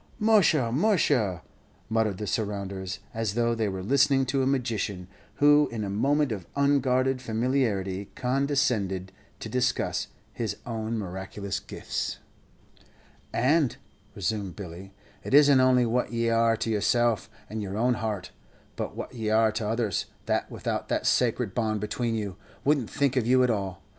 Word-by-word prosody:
"Musha, 200 Hz, -, +4 dB
musha!" 130 Hz, -, +2 dB, 0.4 s
muttered 110 Hz, -3 st, 0 dB
the 105 Hz, -, -4 dB
surrounders, 100 Hz, -3 st, -3 dB
as 110 Hz, -2 st, -2 dB
though 120 Hz, 0 st, +2 dB
they 110 Hz, -2 st, 0 dB
were 95 Hz, -1 st, -4 dB
listening 135 Hz, +3 st, +3 dB
to 135 Hz, +1 st, 0 dB
a 130 Hz, -, +1 dB
magician, 115 Hz, -8 st, -1 dB, 0.3 s
who 145 Hz, 0 st, +5 dB
in 115 Hz, -2 st, -3 dB
a 100 Hz, -, -3 dB
moment 140 Hz, +6 st, +2 dB
of 95 Hz, -6 st, -5 dB
unguarded 130 Hz, -2 st, +2 dB
familiarity 110 Hz, -6 st, -1 dB
condescended 125 Hz, -8 st, 0 dB, 0.3 s
to -, -, -6 dB
discuss 125 Hz, -1 st, 0 dB, 0.3 s
his 110 Hz, -4 st, -3 dB
own 115 Hz, -1 st, -3 dB
miraculous 95 Hz, 0 st, -4 dB
gifts. -, -, -4 dB, 1.1 s
"And," 140 Hz, +2 st, +2 dB, 0.4 s
resumed 100 Hz, -3 st, -2 dB
Billy, 95 Hz, 0 st, -9 dB, 0.3 s
"it -, -, +1 dB
isn't 145 Hz, -2 st, +7 dB
only 130 Hz, -1 st, +4 dB
what 120 Hz, +2 st, 0 dB
ye 115 Hz, 0 st, 0 dB
are 115 Hz, 0 st, +3 dB
to 115 Hz, -, -2 dB
yourself 115 Hz, +1 st, +1 dB, 0.2 s
and 110 Hz, 0 st, -5 dB
your 100 Hz, 0 st, -4 dB
own 125 Hz, +3 st, +3 dB
heart, 110 Hz, -5 st, -3 dB, 0.4 s
but -, -, -4 dB
what -, -, -6 dB
ye 110 Hz, -3 st, -3 dB
are 110 Hz, 0 st, +4 dB
to 110 Hz, 0 st, -3 dB
others, 110 Hz, -3 st, -1 dB, 0.2 s
that -, -, 0 dB
without -, -, -3 dB
that -, -, 0 dB
sacret 120 Hz, -4 st, +1 dB
bond 110 Hz, -3 st, 0 dB
between 115 Hz, +2 st, -2 dB
you, 100 Hz, -4 st, -4 dB, 0.3 s
wouldn't 140 Hz, -6 st, +2 dB
think 140 Hz, -2 st, 0 dB
of 120 Hz, -3 st, +1 dB
you 130 Hz, +1 st, +5 dB
at 125 Hz, -, +3 dB
all. 95 Hz, -3 st, -3 dB
115 Hz, 155 wpm, -27 LUFS, 100-130 Hz, 1.1 s, isn't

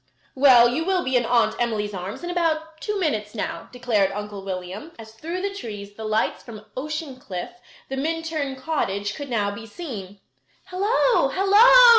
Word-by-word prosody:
"Well, 255 Hz, -3 st, +7 dB
you 260 Hz, +7 st, 0 dB
will 370 Hz, 0 st, +1 dB
be 260 Hz, 0 st, 0 dB
in 240 Hz, -2 st, +3 dB
Aunt 240 Hz, -1 st, +3 dB
Emily's 215 Hz, -3 st, -1 dB
arms 190 Hz, -, -6 dB
in 350 Hz, -, -3 dB
about 320 Hz, -2 st, -1 dB
two 420 Hz, -2 st, -2 dB
minutes 215 Hz, -, -1 dB
now," 170 Hz, -5 st, -4 dB
declared 225 Hz, -6 st, +1 dB
Uncle 205 Hz, -1 st, -6 dB
William, 190 Hz, -, -6 dB
as 220 Hz, -1 st, -11 dB
through 335 Hz, +10 st, -5 dB
the 400 Hz, 0 st, -1 dB
trees 205 Hz, -, -7 dB
the 220 Hz, +1 st, -7 dB
lights 215 Hz, +1 st, 0 dB
from 215 Hz, -3 st, -11 dB
Ocean 300 Hz, 0 st, -4 dB
Cliff, 185 Hz, -8 st, -6 dB, 0.4 s
the 270 Hz, -, -4 dB
Minturn 315 Hz, -2 st, -2 dB
cottage, 205 Hz, -9 st, -2 dB
could 285 Hz, -2 st, -7 dB
now 210 Hz, -4 st, 0 dB
be 225 Hz, +2 st, -8 dB
seen. 205 Hz, -, -7 dB, 0.5 s
"Hello! 420 Hz, +6 st, +3 dB
Hello!" 455 Hz, +6 st, +7 dB
250 Hz, 170 wpm, -24 LUFS, 210-325 Hz, 0.5 s, Well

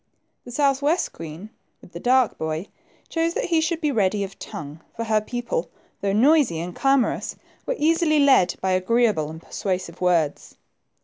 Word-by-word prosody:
The 245 Hz, -, -9 dB
south 275 Hz, +1 st, +2 dB
west 310 Hz, +5 st, +1 dB
queen, 165 Hz, +6 st, -9 dB, 0.3 s
with -, -, -17 dB
the 170 Hz, -, -7 dB
dark 250 Hz, +2 st, +3 dB
boy, 160 Hz, +4 st, -3 dB, 0.4 s
chose 330 Hz, 0 st, -1 dB
that -, -, -1 dB
he 320 Hz, -, +4 dB
should 325 Hz, +1 st, -1 dB
be 300 Hz, -3 st, 0 dB
ready 205 Hz, -4 st, +1 dB
of 195 Hz, 0 st, -8 dB
tongue 150 Hz, +1 st, -8 dB, 0.2 s
for 230 Hz, -, -3 dB
her 215 Hz, -1 st, +1 dB
people, 230 Hz, -7 st, -3 dB, 0.3 s
though 200 Hz, -, 0 dB
noisy 250 Hz, -, +4 dB
and 175 Hz, +1 st, -5 dB
clamorous, 270 Hz, -2 st, +1 dB, 0.3 s
were -, -, 0 dB
easily 320 Hz, 0 st, +2 dB
led 275 Hz, -11 st, +4 dB
by 190 Hz, -, 0 dB
agreeable 185 Hz, -4 st, +2 dB
and 160 Hz, +1 st, -8 dB
persuasive 185 Hz, 0 st, -4 dB
words. 170 Hz, -5 st, 0 dB
215 Hz, 170 wpm, -23 LUFS, 175-280 Hz, 0.4 s, he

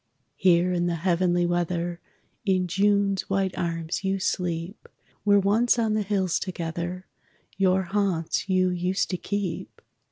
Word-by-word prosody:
Here 180 Hz, 0 st, +3 dB
in 175 Hz, 0 st, 0 dB
the 170 Hz, -, 0 dB
heavenly 175 Hz, +1 st, +1 dB
weather 175 Hz, 0 st, -1 dB, 0.4 s
In 185 Hz, -3 st, +2 dB
June's 200 Hz, +1 st, +1 dB
white 195 Hz, -1 st, 0 dB
arms 165 Hz, +1 st, -3 dB
you 195 Hz, 0 st, 0 dB
sleep, 180 Hz, 0 st, -3 dB, 0.3 s
Where 205 Hz, -1 st, +5 dB
once 220 Hz, +5 st, +3 dB
on 225 Hz, -2 st, +1 dB
the 215 Hz, -, +1 dB
hills 190 Hz, -3 st, 0 dB
together 175 Hz, 0 st, -4 dB, 0.5 s
Your 190 Hz, -1 st, +2 dB
haunts 190 Hz, -1 st, -1 dB
you 185 Hz, -1 st, +3 dB
used 180 Hz, +3 st, -1 dB
to 180 Hz, -, -1 dB
keep. 200 Hz, -2 st, -4 dB
185 Hz, 135 wpm, -26 LUFS, 175-195 Hz, 0.5 s, Where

